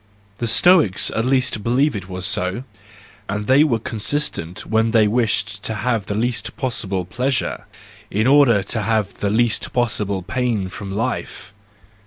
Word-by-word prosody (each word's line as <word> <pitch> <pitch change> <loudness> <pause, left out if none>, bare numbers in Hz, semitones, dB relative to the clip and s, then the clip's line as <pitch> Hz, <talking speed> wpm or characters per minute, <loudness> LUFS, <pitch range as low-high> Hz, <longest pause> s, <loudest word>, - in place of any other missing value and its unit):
The 120 - -1
Stoics 155 - +4
at 110 - -1
least 130 -4 +1
believed 125 +5 +1
it 95 -2 -6
was 95 0 -4
so, 95 +8 0 0.7
and 105 +1 -2
they 135 +6 +5
were 135 -7 +2
consistent 110 - -3
when 110 +1 +1
they 110 -2 +4
wished 105 -3 -1
to 110 - -4
have 115 -1 -1
the 100 - -2
least 115 -1 -2
possible 100 -8 -2
pleasure, 125 +8 -2 0.4
in 110 +3 0
order 130 -7 +5
to 110 +3 -2
have 105 -1 0
the 100 - 0
least 115 +2 0
possible 105 -6 -1
pain 110 -2 -1
from 100 +1 -8
life. 110 -1 -4
110 Hz, 155 wpm, -20 LUFS, 100-125 Hz, 0.7 s, they